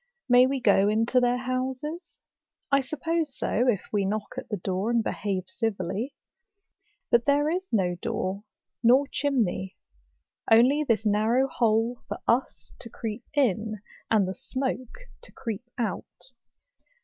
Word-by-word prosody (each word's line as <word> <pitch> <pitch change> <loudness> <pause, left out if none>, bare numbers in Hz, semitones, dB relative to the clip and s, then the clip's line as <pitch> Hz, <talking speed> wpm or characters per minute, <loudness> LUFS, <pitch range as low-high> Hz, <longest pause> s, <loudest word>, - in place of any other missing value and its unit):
May 250 0 +6
we 270 0 -1
go 200 -4 +4
into 225 +4 +2
their 245 0 +2
houses?—I 265 +3 -4
suppose 310 +2 -2
so, 245 +4 0
if 210 -6 +2
we 205 -1 +2
knock 205 +1 -2
at - - -7
the 210 - -2
door, 190 +3 -2
and 235 -1 +2
behave 195 -4 -2
civilly. 225 +2 -3 1.0
But 235 0 +4
there 290 +2 +3
is 370 +2 -2
no 190 -6 +2
door 205 -3 -2 0.4
nor 255 +4 +5
chimney; 225 -10 -1 0.7
only 255 +7 +5
this 230 -5 +1
narrow 220 +5 +3
hole 230 -1 +1
for - - -4
us 245 +3 0
to 230 - -10
creep 225 +1 -6
in, 220 -5 +1 0.3
and 210 -4 +3
the 190 - -3
smoke 255 - -4 0.2
to - - -14
creep 230 -2 -5
out. 230 +3 -5
235 Hz, 135 wpm, -27 LUFS, 210-265 Hz, 1.0 s, May